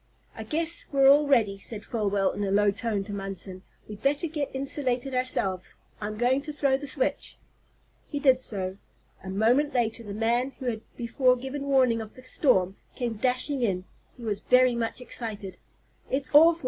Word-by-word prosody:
"I - - -8
guess 330 +2 -2
we're 275 -1 +5
all 290 +2 +6
ready," 220 -8 +3
said 210 +1 -7
Folwell, 205 -4 0
in 205 - -3
a 200 - -1
low 205 +1 +4
tone 210 -1 -2
to 205 +1 -7
Munson. 195 -1 -5 0.3
"We'd 210 -1 -9
better 285 +4 +1
get 300 -3 -3
insulated 265 -1 -1
ourselves. 200 -8 -1 0.3
I'm 210 +1 -4
going 250 +4 +2
to 300 +2 -6
throw 280 -2 +2
the 285 +2 -5
switch." - - -2 0.7
He 290 - -3
did 265 -3 +4
so. 190 -5 -4 0.5
A 190 - -7
moment 240 +9 +2
later 235 -1 0
the 205 -3 -7
man 240 +4 +1
who 260 - -8
had 225 -3 -2 0.2
before 250 +2 +2
given 270 +3 -5
warning 255 -4 +3
of 220 -1 -9
the 255 - -13
storm 200 - +2 0.2
came 235 -4 -3
dashing 255 +4 0
in. 185 -5 0 0.3
He 245 - -11
was 210 -3 -2
very 250 +1 +4
much 235 +1 -2
excited. 215 -6 -4 0.5
"It's 270 +1 -1
awful!" 325 +3 +7
245 Hz, 180 wpm, -27 LUFS, 205-275 Hz, 0.7 s, awful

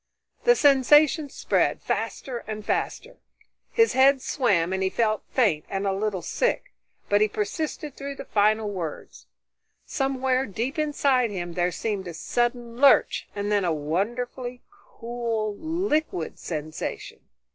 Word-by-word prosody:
The 485 0 +6
sensation 290 - +5
spread, - - 0
faster 250 -3 -3
and 215 -1 -5
faster. - - -2 0.5
His 455 0 +3
head 270 +1 +5
swam 200 - +1
and 190 - -1
he 190 - +1
felt 215 0 0
faint 200 - +2
and 195 0 -2
a 195 - +1
little 195 -2 -2
sick, - - -1 0.3
but 205 0 +3
he 215 - +5
persisted 285 +8 -4
through 280 0 -6
the 275 - -8
final 215 0 +2
words. 170 -6 -7 0.6
Somewhere 265 -1 0
deep 235 +9 -3
inside 280 -5 +2
him 175 -4 -5
there 175 +1 0
seemed 195 0 -3
a 170 - -7
sudden 240 +5 -2
lurch, 280 +1 +4
and 205 0 -2
then 205 -1 +2
a 175 - +1
wonderfully 240 - -3
cool, 235 - -4
liquid 315 - -2
sensation. 155 -1 -5
235 Hz, 135 wpm, -25 LUFS, 200-275 Hz, 0.6 s, The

